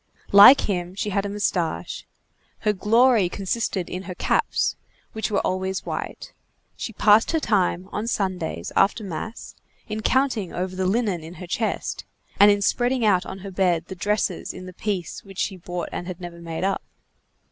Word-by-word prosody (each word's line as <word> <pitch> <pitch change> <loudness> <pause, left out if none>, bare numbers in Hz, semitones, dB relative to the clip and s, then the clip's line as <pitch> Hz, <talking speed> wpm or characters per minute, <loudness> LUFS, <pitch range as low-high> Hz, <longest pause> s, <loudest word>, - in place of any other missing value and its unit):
Like 205 +7 +10
him, 180 -2 -2
she 205 +1 -2
had 200 +1 0
a - - -5
moustache. 175 - -2 0.5
Her 210 - +2
glory 220 0 +4
consisted 195 -1 -2
in 180 - -5
her 180 - -5
caps, - - +1 0.4
which 220 - -2
were 205 - +1
always 190 +1 -2
white. - - -5 0.4
She - - -5
passed 210 +1 +4
her 325 - +3
time, 185 - +1
on 215 +2 -3
Sundays, 180 - -2
after 205 +3 +3
mass, 200 +4 -6 0.3
in 215 0 -4
counting 255 -6 +1
over 185 +1 -3
the 185 0 0
linen 200 -5 0
in 165 +3 -9
her 180 - -8
chest, 215 +5 -2 0.4
and 205 - +9
in 205 0 +3
spreading 245 +2 +1
out 190 -4 +3
on - - -6
her 195 - -6
bed 180 -3 +1
the 190 - -6
dresses 205 0 -1
in 185 - -8
the 185 - -9
piece 190 -3 -4
which 195 -2 -13
she 195 - -1
bought 175 -1 -5
and 175 - -5
never 175 -1 -8
had 170 - -12
made 165 +1 -4
up. 195 0 0
195 Hz, 180 wpm, -24 LUFS, 180-210 Hz, 0.5 s, Like